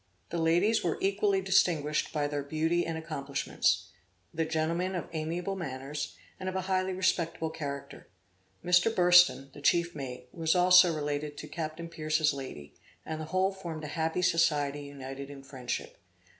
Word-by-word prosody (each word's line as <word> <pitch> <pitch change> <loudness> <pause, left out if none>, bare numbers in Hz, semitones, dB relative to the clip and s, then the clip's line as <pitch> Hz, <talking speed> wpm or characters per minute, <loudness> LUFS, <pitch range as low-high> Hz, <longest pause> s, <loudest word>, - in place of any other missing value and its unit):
The 170 - -1
ladies 175 +7 +3
were 170 - 0
equally 195 0 +1
distinguished 165 -6 +2
by 150 -2 0
their 145 0 -2
beauty 160 +4 0
and 165 -1 -2
accomplishments; 140 - -1 0.4
the 160 0 0
gentlemen 165 +4 -1
of 175 - -3
amiable 170 +5 -2
manners, 140 -4 -5 0.2
and 185 0 -3
of 185 - -6
a 190 - 0
highly 185 0 0
respectable 170 -3 0
character. 140 -3 -6 0.6
Mr. 180 +5 +4
Burston, 175 -8 +5
the 145 - -11
chief 170 +3 +2
mate, 130 -4 -7
was 165 0 +1
also 180 0 +7
related 145 0 -3
to 150 - -7
Captain 160 +1 -5
Pierce's 155 -2 +1
lady, 75 - -8 0.3
and 160 0 -4
the - - -4
whole 185 +4 +1
formed 170 -5 -7
a 150 - -5
happy 165 +2 -1
society 150 -5 +2
united 140 -1 -8
in 140 -1 -10
friendship. 130 -3 -5
160 Hz, 155 wpm, -30 LUFS, 145-180 Hz, 0.6 s, also